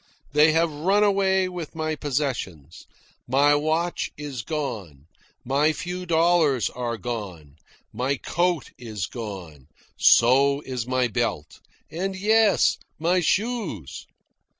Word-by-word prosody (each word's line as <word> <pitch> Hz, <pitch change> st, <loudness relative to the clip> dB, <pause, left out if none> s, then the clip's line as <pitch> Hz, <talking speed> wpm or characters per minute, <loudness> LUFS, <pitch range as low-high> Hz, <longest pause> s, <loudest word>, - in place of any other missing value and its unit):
They 150 Hz, +2 st, +5 dB
have 165 Hz, 0 st, +2 dB
run 190 Hz, +8 st, +2 dB
away 190 Hz, -2 st, +2 dB
with 175 Hz, -3 st, -7 dB
my 155 Hz, -1 st, -2 dB
possessions. 125 Hz, -, -4 dB, 0.4 s
My 140 Hz, +4 st, +4 dB
watch 160 Hz, +4 st, 0 dB
is 145 Hz, -5 st, -5 dB
gone. 110 Hz, -, -5 dB, 0.4 s
My 145 Hz, +5 st, +2 dB
few 180 Hz, +2 st, -6 dB
dollars 165 Hz, -, +2 dB
are 120 Hz, -2 st, -4 dB
gone. 95 Hz, -12 st, -7 dB, 0.4 s
My 130 Hz, +5 st, -1 dB
coat 175 Hz, +4 st, -1 dB
is 110 Hz, -6 st, -5 dB
gone. 95 Hz, -, -8 dB, 0.3 s
So 140 Hz, +4 st, +5 dB
is 125 Hz, -4 st, -5 dB
my 130 Hz, -1 st, +1 dB
belt. 115 Hz, -10 st, -3 dB, 0.3 s
And 190 Hz, +4 st, -3 dB
yes, 215 Hz, +1 st, +3 dB, 0.2 s
my 175 Hz, +4 st, +1 dB
shoes. 190 Hz, -, -2 dB
145 Hz, 115 wpm, -24 LUFS, 120-175 Hz, 0.4 s, They